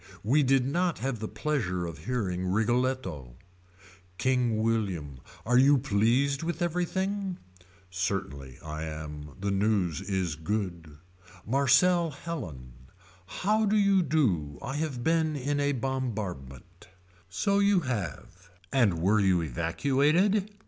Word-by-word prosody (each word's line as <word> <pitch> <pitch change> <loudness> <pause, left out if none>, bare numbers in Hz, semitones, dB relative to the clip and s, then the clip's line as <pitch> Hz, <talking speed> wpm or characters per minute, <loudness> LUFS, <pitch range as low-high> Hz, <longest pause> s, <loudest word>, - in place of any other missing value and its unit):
We 135 +9 +3
did 135 -2 +3
not 170 +5 0
have 125 -1 -3
the 110 - -4
pleasure 100 - -2
of 80 -1 -8
hearing 95 -7 -2
Rigoletto. 110 - -1 0.9
William 110 - +1
King. 65 - -15 0.3
Are 125 +2 +4
you 140 +2 +6
pleased 130 +4 +1
with 170 +1 -2
everything. 190 +2 -1 0.5
Certainly 90 -8 -3
I 75 0 -5
am 75 -2 -7
the 100 +1 -1
news 100 -5 +1
is 95 -5 -2
good. 85 -3 -4 0.5
Marcelle 140 - +3
Helen. 110 - -7 0.5
How 215 - 0
do 215 +2 +3
you 200 -2 +4
do 95 - 0
I 135 +3 -3
have 145 -6 -3
been 160 0 +1
in 145 +1 -1
a 145 0 +2
bombardment. 110 - -5 0.4
So 200 - +1
you 200 -2 +4
have. 95 - -5 0.2
And 100 -11 +2
were 105 +3 +4
you 95 -4 +3
evacuated. 145 - +1
115 Hz, 120 wpm, -28 LUFS, 90-145 Hz, 0.9 s, you